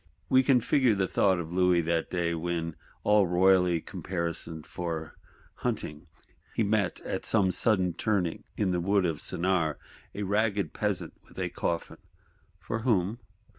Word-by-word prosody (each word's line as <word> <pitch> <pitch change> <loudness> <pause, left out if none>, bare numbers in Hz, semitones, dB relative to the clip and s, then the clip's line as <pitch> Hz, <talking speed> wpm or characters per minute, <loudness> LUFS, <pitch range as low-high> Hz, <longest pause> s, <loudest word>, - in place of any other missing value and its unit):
We 130 - +6
can 130 -2 +4
figure 125 -2 +3
the 95 -1 +1
thought 95 0 +3
of 85 -1 -5
Louis 90 -1 +4
that 85 0 -1
day, 85 -2 0
when, 85 -1 -2 0.3
all 105 -2 +4
royally 90 -1 +4
caparisoned 85 -3 -4
for 80 -2 -5 0.4
hunting, 75 +3 -3 0.5
he 115 - +2
met, 105 -2 +1
at - - -4
some 100 -4 +2
sudden 95 -4 +2
turning 90 -3 -1
in 100 -3 +1
the 90 -1 0
Wood 100 +1 +2
of 80 -3 -1
Senart, 85 -4 0 0.4
a 105 - -3
ragged 100 -3 0
Peasant 95 -6 -2
with - - -18
a - - -1
coffin: 85 -1 -3 0.6
'For 110 - -4
whom? 110 -2 +1
90 Hz, 150 wpm, -28 LUFS, 85-105 Hz, 0.6 s, We